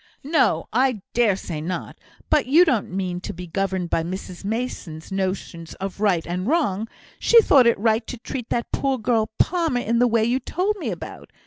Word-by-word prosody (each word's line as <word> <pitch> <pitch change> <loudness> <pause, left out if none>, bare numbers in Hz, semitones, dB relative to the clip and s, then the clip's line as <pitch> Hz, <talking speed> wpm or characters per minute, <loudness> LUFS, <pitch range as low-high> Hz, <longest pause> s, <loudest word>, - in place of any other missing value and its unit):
"No, 295 0 +2
I 250 -4 +1
dare 230 -5 +3
say 165 -5 -5
not. 180 +4 -5 0.3
But 295 -4 +3
you 325 +7 +6
don't 250 - +1
mean 180 -1 -3
to - - -5
be 180 +1 -7
governed 185 0 -2
by - - +2
Mrs 180 +2 -6
Mason's 200 -7 -4
notions 185 -3 -3
of 195 0 -6
right 195 -6 +2
and 180 +3 -3
wrong. 235 - +1 0.3
She 470 - +6
thought 275 - +5
it 235 - +4
right 220 +2 +1
to 250 - -6
treat 240 +1 -6
that 235 - -2
poor 270 -1 0
girl 220 -1 +1
Palmer 330 -8 +1
in 230 +1 0
the 245 - +5
way 230 -1 +2
you 245 +3 +1
told 370 +10 -1
me 360 - -3
about. - - -8
220 Hz, 195 wpm, -23 LUFS, 185-255 Hz, 0.3 s, you